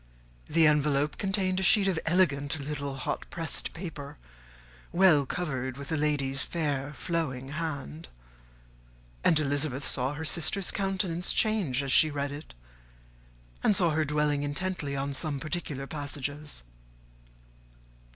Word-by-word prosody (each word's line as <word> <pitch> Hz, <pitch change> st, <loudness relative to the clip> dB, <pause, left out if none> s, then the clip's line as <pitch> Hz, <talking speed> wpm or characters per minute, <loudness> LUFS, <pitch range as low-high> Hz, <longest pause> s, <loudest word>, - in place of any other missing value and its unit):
The 160 Hz, +1 st, +4 dB
envelope 150 Hz, -1 st, +2 dB
contained 190 Hz, -2 st, 0 dB
a -, -, -1 dB
sheet 195 Hz, +1 st, +5 dB
of 180 Hz, -4 st, +1 dB
elegant, 155 Hz, -4 st, +2 dB
little, 140 Hz, -1 st, -4 dB
hot 135 Hz, -, -4 dB
pressed 165 Hz, -2 st, -2 dB
paper, 150 Hz, -5 st, -7 dB, 0.7 s
well 170 Hz, -6 st, +5 dB
covered 130 Hz, -7 st, -3 dB
with 140 Hz, +1 st, -7 dB
a -, -, +1 dB
lady's 145 Hz, -3 st, 0 dB
fair, 145 Hz, -4 st, -2 dB
flowing 135 Hz, -7 st, -3 dB
hand; 140 Hz, -, -4 dB, 1.2 s
and 160 Hz, -, +5 dB
Elizabeth 145 Hz, -2 st, 0 dB
saw 130 Hz, +2 st, 0 dB
her 160 Hz, +2 st, -5 dB
sister's 170 Hz, +5 st, +2 dB
countenance 190 Hz, -3 st, 0 dB
change 190 Hz, -, +2 dB
as 135 Hz, -, -2 dB
she 155 Hz, +3 st, +7 dB
read 140 Hz, -1 st, -3 dB
it, 145 Hz, -, -9 dB, 1.1 s
and 210 Hz, -, +4 dB
saw 175 Hz, -3 st, +5 dB
her 155 Hz, +1 st, +1 dB
dwelling 150 Hz, -1 st, +1 dB
intently 145 Hz, 0 st, -2 dB
on 140 Hz, +1 st, -2 dB
some 145 Hz, 0 st, -1 dB
particular 155 Hz, -2 st, -4 dB
passages. 145 Hz, -, -4 dB
150 Hz, 130 wpm, -29 LUFS, 140-170 Hz, 1.2 s, she